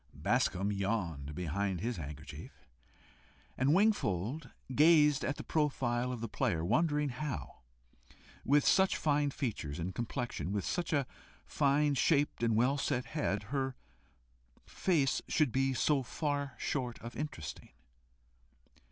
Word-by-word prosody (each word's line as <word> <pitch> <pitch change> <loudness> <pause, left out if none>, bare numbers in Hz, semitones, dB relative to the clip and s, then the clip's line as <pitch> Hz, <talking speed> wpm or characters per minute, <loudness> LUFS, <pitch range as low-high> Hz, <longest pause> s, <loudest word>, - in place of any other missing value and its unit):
Bascombe 100 +3 +1
yawned 90 -8 -2
behind 90 +3 -1
his 115 +4 -2
handkerchief, 75 -2 -9 0.9
and 130 +3 +2
Wingfold 150 - +1 0.2
gazed 150 0 +5
at 145 - -1
the - - -7
profile 125 -5 0
of 120 -3 -5
the 115 - -2
player, 85 -5 -1
wondering 150 - +2
how, 135 +2 -5 0.8
with 145 +2 +3
such 190 0 +4
fine 145 -1 +2
features 110 - -3
and 90 +3 -3
complexion, 120 - -3
with 100 -3 -1
such 175 -1 -2
a 145 -4 +2 0.4
fine 145 0 +2
shaped 145 0 +2
and 115 -2 +2
well 130 +5 +2
set 130 -3 -1
head? 155 -2 -2
her 135 -2 -1 0.9
face 150 -8 +1
should 150 -6 +2
be 135 +2 +1
so 140 +2 +2
far 140 +1 -2
short 125 -4 -2
of 115 +1 -8
interesting. 135 - -6
130 Hz, 125 wpm, -33 LUFS, 105-150 Hz, 0.9 s, gazed